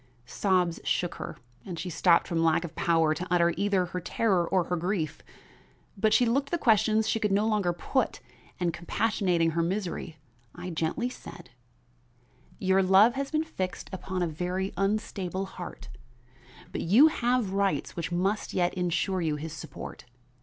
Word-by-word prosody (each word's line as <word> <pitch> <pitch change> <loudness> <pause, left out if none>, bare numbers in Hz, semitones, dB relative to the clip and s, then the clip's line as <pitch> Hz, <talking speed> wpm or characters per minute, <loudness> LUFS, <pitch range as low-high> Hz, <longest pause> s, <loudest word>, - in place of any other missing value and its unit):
Sobs 180 - +1
shook 175 - 0
her - - -6 0.3
and 180 -3 -6
she 180 +2 -4
stopped 170 +1 +4
from 165 -1 0
lack 165 +1 +3
of 170 - -7
power 165 -2 +2
to 175 +4 -5
utter 170 -1 +3
either 200 -2 +1
her 180 +1 -4
terror 180 -1 +1
or 185 -2 +2
her 180 - -2
grief. 165 -3 -2 0.7
But 215 +2 +2
she 225 +3 +5
looked 275 +4 +1
the 345 - 0
questions 220 -4 +3
she 225 - +1
could 210 -2 0
no 205 +2 +2
longer 210 -5 +1
put, 225 +8 -1 0.4
and 175 -2 0
compassionating 180 -2 0
her 170 +1 0
misery, 175 -2 -3 0.4
I 180 +1 -6
gently 165 +9 -1
said: 125 - -11 1.1
"Your 190 0 +3
love 195 +5 +6
has 275 0 -3
been 310 0 +1
fixed 190 -13 -5
upon 185 -1 -3
a - - +1
very 180 +4 -3
unstable 195 -1 -1
heart; 180 -2 -9 0.8
but - - -3
you 220 - +6
have 240 -8 0
rights 195 0 0
which 170 0 -4
must 190 +5 -1
yet 175 -1 +2
insure 180 +1 0
you 155 -3 0
his 155 +1 -6
support. - - -9
185 Hz, 165 wpm, -28 LUFS, 170-210 Hz, 1.1 s, love